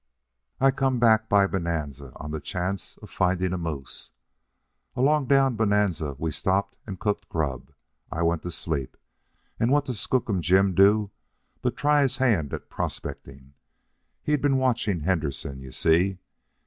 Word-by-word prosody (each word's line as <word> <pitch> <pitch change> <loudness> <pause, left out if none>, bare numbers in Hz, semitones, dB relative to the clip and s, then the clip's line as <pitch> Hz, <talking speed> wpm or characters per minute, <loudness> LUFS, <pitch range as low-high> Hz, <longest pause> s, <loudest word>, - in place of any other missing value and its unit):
I 135 0 +5
come 135 -1 0
back 110 -2 +4
by 100 -1 +5
Bonanza 75 -8 -3
on 75 - -7
the 80 - -3
chance 90 +2 -4
of - - -11
finding 90 0 +1
a - - -1
moose. 75 -6 -4 0.9
Along 140 +2 +2
down 135 -2 +4
Bonanza 100 -9 +1
we 80 +2 -2
stopped 95 +6 0
and 95 -3 -6
cooked 105 -1 -2
grub. 70 -4 -3 0.4
I 85 - -1
went 85 -1 +1
to 90 - -5
sleep, 80 -5 -3 0.6
and 115 - +2
what 145 +1 +3
does 125 -6 -4
Skookum 110 -7 0
Jim 95 +4 +3
do 100 +2 +4 0.5
but - - -1
try 145 0 +3
his 135 -3 +2
hand 105 - +2
at - - -6
prospecting. 70 0 -6 0.7
He'd 150 -2 +1
been 140 -2 +3
watching 115 -9 0
Henderson, 75 -5 -2
you 65 -1 -10
see. 85 +7 +2
95 Hz, 150 wpm, -26 LUFS, 80-115 Hz, 0.9 s, I